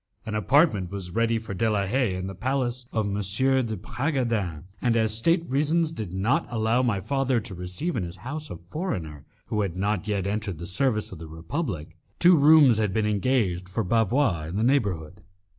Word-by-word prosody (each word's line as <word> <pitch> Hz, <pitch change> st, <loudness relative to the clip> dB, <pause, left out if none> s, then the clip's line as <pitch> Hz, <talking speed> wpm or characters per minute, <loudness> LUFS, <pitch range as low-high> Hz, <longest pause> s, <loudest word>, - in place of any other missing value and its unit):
An 110 Hz, -, -4 dB
apartment 105 Hz, -, +3 dB
was 95 Hz, -2 st, -6 dB
ready 115 Hz, +3 st, +1 dB
for 110 Hz, -2 st, -6 dB
De 110 Hz, +4 st, +1 dB
la 100 Hz, -2 st, +1 dB
Haye 115 Hz, -2 st, 0 dB
in 95 Hz, 0 st, -4 dB
the 95 Hz, -, -5 dB
palace 125 Hz, +3 st, -2 dB
of 110 Hz, -2 st, 0 dB
M. 100 Hz, -, -2 dB
de 110 Hz, +4 st, +1 dB
Bragadin, 115 Hz, -, -2 dB, 0.2 s
and 120 Hz, -2 st, +2 dB
as 110 Hz, -2 st, +1 dB
state 165 Hz, +9 st, +1 dB
reasons 155 Hz, +4 st, +1 dB
did 110 Hz, -, -6 dB
not 100 Hz, +8 st, 0 dB
allow 115 Hz, +1 st, +1 dB
my 115 Hz, -6 st, +1 dB
father 130 Hz, +4 st, 0 dB
to 105 Hz, -3 st, -8 dB
receive 90 Hz, -, -4 dB
in 115 Hz, -, -1 dB
his 85 Hz, +1 st, -5 dB
own 95 Hz, -, -18 dB
house 150 Hz, +4 st, -5 dB
a -, -, -6 dB
foreigner 85 Hz, -, -5 dB, 0.2 s
who 105 Hz, -, -1 dB
had 95 Hz, -4 st, -2 dB
not 105 Hz, +1 st, -1 dB
yet 100 Hz, -3 st, -1 dB
entered 100 Hz, -3 st, -2 dB
the 85 Hz, -, -7 dB
service 110 Hz, +4 st, +1 dB
of -, -, -9 dB
the 80 Hz, -, -8 dB
Republic, 80 Hz, -, -5 dB, 0.2 s
two 180 Hz, +1 st, +6 dB
rooms 145 Hz, -5 st, +6 dB
had 105 Hz, -3 st, 0 dB
been 110 Hz, -1 st, +1 dB
engaged 100 Hz, -4 st, 0 dB
for 110 Hz, +4 st, -1 dB
Bavois 110 Hz, -, +1 dB
in 85 Hz, -, -6 dB
the 105 Hz, -, 0 dB
neighbourhood. 100 Hz, -, 0 dB
110 Hz, 200 wpm, -26 LUFS, 95-130 Hz, 0.2 s, two